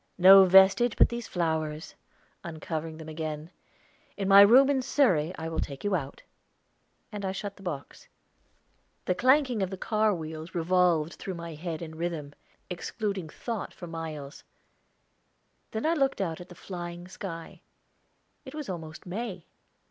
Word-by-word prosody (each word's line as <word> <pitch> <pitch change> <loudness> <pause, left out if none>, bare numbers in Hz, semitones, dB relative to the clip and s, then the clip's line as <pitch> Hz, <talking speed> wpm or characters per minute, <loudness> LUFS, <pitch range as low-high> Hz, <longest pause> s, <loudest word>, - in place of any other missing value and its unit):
"No 190 +1 +9
vestige 190 +5 +5
but - - +6
these 235 -1 -5
flowers," 160 -2 -2 0.5
uncovering 160 -1 -5
them 160 -1 -10
again. 155 0 -5 0.7
"In 195 -2 -2
my 195 0 +9
room 245 +7 +8
at 265 -2 0
Surrey 180 - +2
I 160 - -5
will 165 0 -3
take 140 -1 -5
you 205 -1 0
out," 140 -6 -3 0.9
and 205 -2 -6
I 190 - -1
shut 200 +1 -5
the - - -17
box. 160 -7 -7 1.0
The - - +2
clanking 255 +1 +3
of 190 - 0
the 190 - -6
car 215 +2 +1
wheels 160 +1 -7
revolved 170 -2 +2
through 190 - -6
my 170 -1 -7
head 165 +1 -5
in 160 -1 -8
rhythm, 160 -3 -4 0.3
excluding 190 -1 -4
thought 230 +6 -5
for 175 - -8
miles. 160 -4 -7 1.3
Then 220 +4 -4
I 325 - +3
looked 275 -4 +1
out 170 -4 -2
at 180 - -12
the 175 - -12
flying 175 -1 -7
sky 165 -3 -8 0.8
it 270 0 -10
was 300 -6 -6
almost 160 -3 -7
May. 190 -2 -5
180 Hz, 155 wpm, -28 LUFS, 160-200 Hz, 1.3 s, No